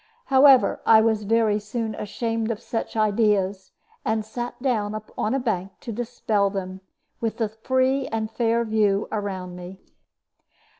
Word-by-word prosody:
However, 265 Hz, -1 st, +6 dB
I 220 Hz, -, +7 dB
was 220 Hz, -1 st, +1 dB
very 220 Hz, -1 st, +2 dB
soon 220 Hz, +1 st, -4 dB
ashamed 225 Hz, +2 st, -3 dB
of 225 Hz, -2 st, -2 dB
such 230 Hz, -1 st, -4 dB
ideas, 205 Hz, -3 st, +1 dB, 0.3 s
and 220 Hz, -1 st, -1 dB
sat 240 Hz, +2 st, -6 dB
down 215 Hz, -5 st, -1 dB, 0.2 s
on 220 Hz, +5 st, 0 dB
a -, -, +1 dB
bank 195 Hz, -6 st, -2 dB
to 235 Hz, -, -6 dB
dispel 220 Hz, -3 st, 0 dB
them 190 Hz, -1 st, -5 dB, 0.4 s
with 225 Hz, -1 st, -2 dB
the 225 Hz, -3 st, 0 dB
free 260 Hz, +4 st, 0 dB
and 220 Hz, -1 st, -3 dB
fair 235 Hz, 0 st, +1 dB
view 210 Hz, -2 st, +1 dB
around 190 Hz, -4 st, -4 dB
me. 180 Hz, +2 st, -9 dB
220 Hz, 145 wpm, -24 LUFS, 205-230 Hz, 0.4 s, I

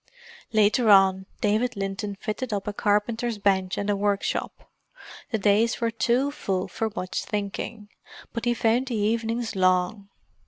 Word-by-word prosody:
Later 215 Hz, +2 st, +3 dB
on, 190 Hz, -1 st, +5 dB
David 220 Hz, +3 st, +1 dB
Linton 195 Hz, +1 st, -3 dB
fitted 215 Hz, +4 st, -4 dB
up 200 Hz, -1 st, -3 dB
a 210 Hz, -, -2 dB
carpenter's 225 Hz, +3 st, 0 dB
bench 190 Hz, -2 st, +1 dB
and 205 Hz, -, -2 dB
a 205 Hz, -, +2 dB
workshop; 200 Hz, 0 st, -2 dB, 0.6 s
the 230 Hz, -, 0 dB
days 210 Hz, +3 st, +2 dB
were 230 Hz, -1 st, 0 dB
too 250 Hz, +5 st, +1 dB
full 190 Hz, -9 st, -2 dB
for 225 Hz, -, -2 dB
much 185 Hz, -3 st, -3 dB
thinking, 210 Hz, +1 st, -4 dB, 0.5 s
but 230 Hz, +1 st, -3 dB
he 240 Hz, 0 st, +2 dB
found 235 Hz, +3 st, +1 dB
the 245 Hz, -, -2 dB
evenings 225 Hz, +2 st, -1 dB
long. 185 Hz, +2 st, +1 dB
210 Hz, 150 wpm, -25 LUFS, 200-230 Hz, 0.6 s, on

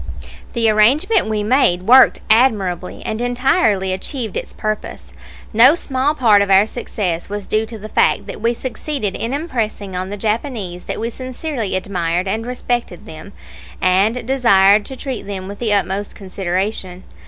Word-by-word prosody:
The 230 Hz, -2 st, +1 dB
arrangement 245 Hz, -, +3 dB
we 210 Hz, -1 st, -1 dB
made 210 Hz, -6 st, +2 dB
worked 255 Hz, +6 st, +6 dB
admirably, 205 Hz, -7 st, +1 dB
and 220 Hz, +2 st, -3 dB
entirely 245 Hz, -, +1 dB
achieved 220 Hz, +3 st, -4 dB
its -, -, -4 dB
purpose. 215 Hz, 0 st, -5 dB, 0.4 s
No 250 Hz, +8 st, +7 dB
small 280 Hz, -2 st, -1 dB
part 220 Hz, -7 st, +4 dB
of 200 Hz, -, 0 dB
our 195 Hz, +1 st, +6 dB
success 200 Hz, -7 st, -4 dB
was 205 Hz, -1 st, -5 dB
due 215 Hz, +1 st, -1 dB
to 225 Hz, 0 st, -8 dB
the 215 Hz, +1 st, -9 dB
fact -, -, +1 dB
that -, -, -8 dB
we 235 Hz, +1 st, +1 dB
succeeded 255 Hz, -4 st, -4 dB
in 230 Hz, -, -3 dB
impressing 230 Hz, -, -3 dB
on 185 Hz, +1 st, -3 dB
the 205 Hz, -, -5 dB
Japanese 210 Hz, -4 st, -3 dB
that -, -, -5 dB
we 230 Hz, +2 st, -3 dB
sincerely 255 Hz, -4 st, -4 dB
admired 180 Hz, -1 st, -2 dB
and 220 Hz, +4 st, -2 dB
respected 245 Hz, -6 st, -3 dB
them, 160 Hz, +5 st, -11 dB, 0.5 s
and 205 Hz, +6 st, +2 dB
desired 205 Hz, -6 st, +4 dB
to 265 Hz, -, -7 dB
treat 260 Hz, -6 st, -6 dB
them 190 Hz, -2 st, -5 dB
with 200 Hz, +1 st, -8 dB
the 230 Hz, -3 st, -1 dB
utmost 200 Hz, 0 st, -1 dB
consideration. 185 Hz, 0 st, -4 dB
215 Hz, 160 wpm, -18 LUFS, 190-245 Hz, 0.5 s, No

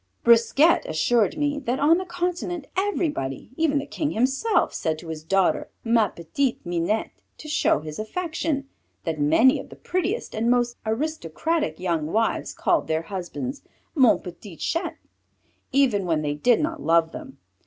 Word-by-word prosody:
Brisquet 235 Hz, +8 st, +5 dB
assured 205 Hz, -, +2 dB
me 290 Hz, -1 st, 0 dB
that 255 Hz, -1 st, -2 dB
on 320 Hz, +5 st, +4 dB
the 375 Hz, -, -4 dB
continent 350 Hz, -2 st, -3 dB
everybody, 315 Hz, -, -2 dB
even 310 Hz, -2 st, +2 dB
the 280 Hz, -, -1 dB
King 300 Hz, -, -2 dB
himself, 270 Hz, -, +1 dB
said 160 Hz, -1 st, -1 dB
to 165 Hz, +1 st, -10 dB
his 155 Hz, -1 st, -6 dB
daughter, 195 Hz, +3 st, +1 dB
Ma 230 Hz, -2 st, +3 dB
petite 235 Hz, -, -2 dB
Minette, 175 Hz, +5 st, -1 dB, 0.3 s
to 305 Hz, -, -10 dB
show 300 Hz, -, +2 dB
his 155 Hz, +2 st, -7 dB
affection, 310 Hz, +3 st, -2 dB, 0.4 s
that 160 Hz, -3 st, -2 dB
many 195 Hz, -, +5 dB
of -, -, -9 dB
the -, -, -11 dB
prettiest 370 Hz, +5 st, -2 dB
and 225 Hz, +2 st, 0 dB
most 240 Hz, -1 st, +2 dB
aristocratic 305 Hz, -, -1 dB
young 170 Hz, -4 st, -1 dB
wives 220 Hz, +7 st, 0 dB
called 340 Hz, -, +1 dB
their 160 Hz, +1 st, 0 dB
husbands, 195 Hz, -, -5 dB, 0.3 s
Mon 260 Hz, -8 st, +5 dB
petit 180 Hz, 0 st, -10 dB
chat, 335 Hz, -, -2 dB, 0.7 s
even 245 Hz, -9 st, +2 dB
when 160 Hz, -2 st, +1 dB
they 145 Hz, -1 st, -1 dB
did 225 Hz, +11 st, +3 dB
not 325 Hz, 0 st, -2 dB
love 165 Hz, 0 st, +3 dB
them. 280 Hz, -4 st, -9 dB
240 Hz, 155 wpm, -24 LUFS, -, 0.7 s, Brisquet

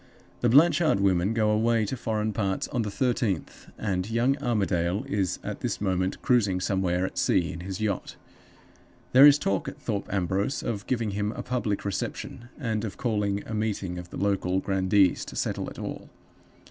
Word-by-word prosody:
The 120 Hz, -, +2 dB
Blanchard 155 Hz, -, +5 dB
women 95 Hz, 0 st, +2 dB
go 110 Hz, -1 st, +2 dB
away 110 Hz, +1 st, +2 dB
to 130 Hz, -, -3 dB
foreign 110 Hz, -3 st, -2 dB
parts 95 Hz, -3 st, -1 dB
on 120 Hz, -, -1 dB
the 105 Hz, -, -2 dB
thirteenth, 115 Hz, -5 st, -1 dB
and 95 Hz, -2 st, -2 dB
young 120 Hz, +4 st, +2 dB
Armadale 95 Hz, -4 st, 0 dB
is 95 Hz, -3 st, -1 dB
at -, -, -5 dB
this -, -, -2 dB
moment 95 Hz, -2 st, -1 dB
cruising 105 Hz, -7 st, +2 dB
somewhere 90 Hz, -1 st, 0 dB
at -, -, -4 dB
sea 85 Hz, 0 st, +2 dB
in 85 Hz, -, -7 dB
his 95 Hz, +1 st, -5 dB
yacht. 105 Hz, -3 st, -2 dB, 1.0 s
There 135 Hz, +3 st, +9 dB
is 145 Hz, 0 st, +7 dB
talk 100 Hz, -9 st, -1 dB
at -, -, -7 dB
Thorpe 105 Hz, -4 st, -3 dB
Ambrose 100 Hz, +6 st, -1 dB
of 105 Hz, -2 st, -4 dB
giving 115 Hz, -4 st, 0 dB
him 105 Hz, +1 st, -1 dB
a -, -, -6 dB
public 115 Hz, -6 st, -2 dB
reception, 100 Hz, +4 st, -4 dB
and 115 Hz, -6 st, -2 dB
of 105 Hz, -4 st, -5 dB
calling 105 Hz, -4 st, -1 dB
a -, -, -6 dB
meeting 100 Hz, -5 st, -2 dB
of 90 Hz, -1 st, -9 dB
the -, -, -8 dB
local 95 Hz, -2 st, +1 dB
grandees 95 Hz, -1 st, +2 dB
to -, -, -9 dB
settle -, -, -2 dB
it -, -, -12 dB
all. -, -, -6 dB
105 Hz, 180 wpm, -27 LUFS, 95-115 Hz, 1.0 s, There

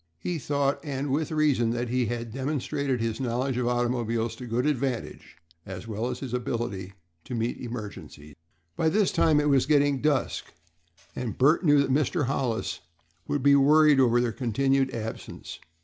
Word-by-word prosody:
He 170 Hz, -, -3 dB
thought, 140 Hz, 0 st, 0 dB
and 140 Hz, -2 st, -3 dB
with 150 Hz, +2 st, 0 dB
reason, 150 Hz, -7 st, +2 dB
that 120 Hz, 0 st, -2 dB
he 125 Hz, -1 st, 0 dB
had 115 Hz, -1 st, -4 dB
demonstrated 135 Hz, -1 st, -2 dB
his 115 Hz, -1 st, -2 dB
knowledge 130 Hz, +1 st, -1 dB
of 125 Hz, -1 st, 0 dB
automobiles 120 Hz, -2 st, -1 dB
to 125 Hz, -, -8 dB
good 120 Hz, +2 st, 0 dB
advantage, 135 Hz, -, -3 dB, 0.3 s
as 95 Hz, +2 st, -8 dB
well 110 Hz, +2 st, -3 dB
as 125 Hz, -1 st, -5 dB
his 130 Hz, -3 st, -5 dB
ability 115 Hz, -6 st, -3 dB, 0.3 s
to 125 Hz, -, -5 dB
meet 115 Hz, +1 st, -2 dB
emergencies. 105 Hz, -, -8 dB, 0.4 s
By 160 Hz, -, +2 dB
this 200 Hz, +3 st, +2 dB
time 155 Hz, -2 st, +3 dB
it 150 Hz, -, +1 dB
was 135 Hz, -2 st, +3 dB
getting 145 Hz, -2 st, +3 dB
near -, -, -9 dB
dusk, 145 Hz, -3 st, 0 dB, 0.6 s
and 120 Hz, -4 st, -4 dB
Bert 150 Hz, +8 st, +4 dB
knew 145 Hz, -3 st, +5 dB
that 140 Hz, -, -2 dB
Mr. 150 Hz, +2 st, +1 dB
Hollis 125 Hz, -3 st, -2 dB, 0.5 s
would 145 Hz, -3 st, -1 dB
be 140 Hz, 0 st, +6 dB
worried 150 Hz, +1 st, +5 dB
over 120 Hz, -2 st, +4 dB
their 120 Hz, -1 st, +1 dB
continued 135 Hz, +3 st, +1 dB
absence. 115 Hz, -1 st, -7 dB
130 Hz, 170 wpm, -27 LUFS, 120-140 Hz, 0.6 s, be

